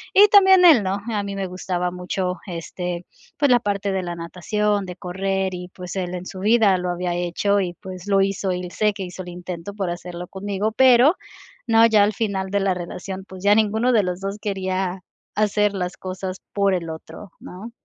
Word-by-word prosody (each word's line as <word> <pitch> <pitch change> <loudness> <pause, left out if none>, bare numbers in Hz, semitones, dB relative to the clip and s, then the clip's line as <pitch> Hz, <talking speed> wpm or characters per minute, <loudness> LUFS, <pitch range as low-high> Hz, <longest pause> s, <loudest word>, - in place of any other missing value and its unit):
y 405 - +9
también 380 -2 +7
él, 295 -10 +8
¿no?, 190 +1 -1
a 210 -2 0
mí 200 0 -5
me 195 -1 -3
gustaba 180 -1 -2
mucho, 180 0 -3
este, 175 0 -5 0.3
pues, 285 -3 +3
la 245 - +6
parte 200 -2 -2
de 190 -1 -1
la 175 -1 -4
natación, 200 +4 -1
de 180 - -7
correr 190 +1 -2
y, 180 0 -6
pues, 180 0 -7
él 180 -1 -3
en 180 - -6
su 185 - -8
vida 215 -1 +4
lo 180 0 -3
había 175 0 -2
hecho, 175 +4 0
y 180 -2 -2
pues, 185 0 -9
lo 195 -1 +3
hizo 195 -1 0
y 180 0 -4
sé 210 -1 +1
que 200 -2 -6
hizo 180 +1 -7
el 180 - -8
intento 180 +2 -7
por 195 -4 -3
hacerlo 175 0 -7
conmigo, 200 +2 -3
pero, 260 - +6 0.5
no, 225 0 +6
ya 215 -2 +5
al 210 +1 +3
final 195 -4 -2
de 200 0 +1
la 195 -1 +1
relación, 185 +2 -6
pues, 190 -1 -11
ya 205 0 +6
ninguno 220 +3 +2
de 215 -3 +4
los 180 0 -3
2 195 +1 -4
quería 190 -2 -2 0.4
hacer 210 -1 +2
las 180 -1 -4
cosas 185 0 -5
por 200 -1 +2
el 170 -2 -3
otro, 160 +4 -9
¿no?, 200 +6 -9
190 Hz, 210 wpm, -22 LUFS, 180-205 Hz, 0.5 s, y